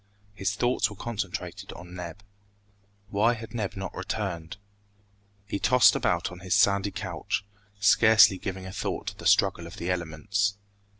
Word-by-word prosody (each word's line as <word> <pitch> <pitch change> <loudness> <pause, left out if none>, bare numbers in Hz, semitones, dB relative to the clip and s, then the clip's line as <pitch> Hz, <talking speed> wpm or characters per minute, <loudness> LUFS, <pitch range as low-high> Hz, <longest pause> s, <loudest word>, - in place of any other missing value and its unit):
His 100 0 -2
thoughts 120 +3 +1
were 105 - -10
concentrated 95 -3 -5
on 90 0 -11
Neb. 90 +2 -8 0.9
Why 110 +4 +2
had 115 0 -9
Neb 105 -5 -3
not 95 -2 -5
returned? 95 -4 -4 0.9
He 100 0 -3
tossed 125 -1 +5
about 85 -1 0
on 90 - -10
his 95 +1 0
sandy 100 -1 +3
couch, 95 -1 -4 0.3
scarcely 105 -1 +6
giving 95 -1 -5
a 95 - -7
thought - - -3
to - - -13
the - - -2
struggle - - +3
of - - -11
the 85 +2 -2
elements. 95 +4 -1
100 Hz, 155 wpm, -27 LUFS, 90-105 Hz, 0.9 s, scarcely